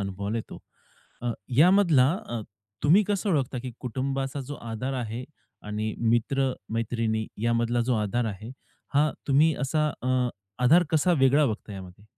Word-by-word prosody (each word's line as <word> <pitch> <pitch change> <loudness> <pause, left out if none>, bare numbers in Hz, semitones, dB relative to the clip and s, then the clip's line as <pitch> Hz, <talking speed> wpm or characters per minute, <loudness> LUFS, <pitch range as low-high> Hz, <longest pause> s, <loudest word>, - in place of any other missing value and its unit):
अनुभवायला 100 +2 -3
येतो. - - -8 0.6
अ, 120 - 0 0.3
यामधला 170 -6 +6 0.2
अ, 120 -1 -3 0.4
तुम्ही 170 +8 +6
कसं 205 0 -1
ओळखता 135 -5 0
की 130 - -5
कुटुंबाचा 135 +3 -3
जो 140 +2 -6 0.2
आधार 125 +5 -3
आहे 115 +3 -5 0.4
आणि 105 +1 -2
मित्र-मैत्रिणी 115 -2 0 0.2
यामधला 115 +1 +1
जो 125 - +3
आधार 110 +3 0
आहे. 110 +2 -6 0.4
हा 150 +2 +4 0.2
तुम्ही 150 +3 +4
असा 150 +3 +1
अ, 130 -1 +1 0.4
आधार 165 +8 +6
कसा 160 +3 +3
वेगळा 140 +3 +5
बघता 110 -2 -4
यामध्ये? 95 0 -10
125 Hz, 140 wpm, -26 LUFS, 110-140 Hz, 0.6 s, यामधला